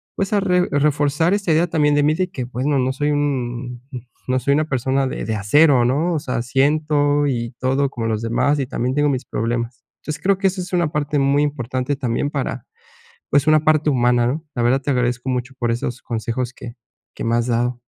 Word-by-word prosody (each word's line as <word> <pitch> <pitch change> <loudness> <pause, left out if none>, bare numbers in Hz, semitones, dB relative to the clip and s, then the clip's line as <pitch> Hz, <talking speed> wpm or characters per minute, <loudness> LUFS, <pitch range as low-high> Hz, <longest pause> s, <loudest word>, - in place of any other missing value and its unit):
pues, 195 +1 -2
a 205 - +4
re 180 -2 +2
reforzar 145 +4 +2
esta 200 -4 -1
idea 165 +3 +3
también 150 -3 +2
de 145 - +3
mí, 150 +1 +3
de 185 +2 -1
que 130 -9 -4
bueno, 130 +4 -1
no 130 0 +1
soy 145 +2 0
un 125 -4 -2 0.5
no 130 0 +1
soy 140 +2 +1
una 155 +1 +1
persona 135 -1 0
de - - -4
de 110 - -2
acero, 125 +5 +4
¿no? 150 +8 +1
O 155 - 0
sea, 125 -3 -3
siento 145 +2 +2
y 120 -4 -2
todo 135 +2 +1
como 115 -4 -4
los 110 -1 -1
demás, 145 +5 +1
y 135 - 0
también 125 +2 -2
tengo 145 0 +2
mis 130 -2 -2
problemas. 115 0 -3 0.2
Entonces, 155 0 -5
creo 195 0 +3
que 195 - +3
eso 185 0 -2
es 180 +1 -8
una 175 -4 +1
parte 150 -1 -1
muy 140 +1 +3
importante 130 -1 -2
también, 125 +1 -1
para, - - -3 0.6
pues, 145 +1 +2
una 155 -1 +5
parte 155 -1 +3
humana, 120 -2 +2
¿no? 155 +6 -3
La 120 - 0
verdad, 130 +3 +2
te 140 - -1
agradezco 125 0 -1
mucho 125 0 -2
por 120 -1 0
esos 120 +1 -3
consejos 120 +2 -3
que 120 -2 -9 0.4
que - - -6
me 115 +1 +1
has 120 +1 0
dado. 120 +1 -1
135 Hz, 215 wpm, -20 LUFS, 120-150 Hz, 0.6 s, una